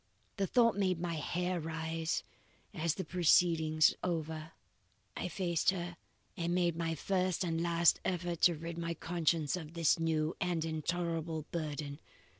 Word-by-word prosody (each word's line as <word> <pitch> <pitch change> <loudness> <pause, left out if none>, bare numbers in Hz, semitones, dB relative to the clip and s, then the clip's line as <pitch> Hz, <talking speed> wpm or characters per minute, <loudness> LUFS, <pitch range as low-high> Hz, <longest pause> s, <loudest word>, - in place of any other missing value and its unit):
The 195 -1 +1
thought 230 0 +4
made 185 -4 +1
my 170 -1 -2
hair 180 +3 -1
rise, 160 0 -2 0.5
as 165 -4 0
the 190 - -4
proceedings 160 -3 +4
over, 160 -2 -3 0.6
I - - -3
faced 175 -2 +1
her 175 -2 -2 0.4
and 170 0 -1
made 175 -2 +2
my 165 -1 -1
first 185 +1 0
and 165 -2 -1
last 170 -1 +4
effort 175 -2 -2
to 175 - +6
rid 165 +2 -6
my 170 0 -2
conscience 165 -2 0
of 165 -1 -8
its 165 -1 +3
new 160 0 0
and 175 -3 0
intolerable 165 0 -2
burden. 150 -3 -4
170 Hz, 145 wpm, -33 LUFS, 160-175 Hz, 0.6 s, to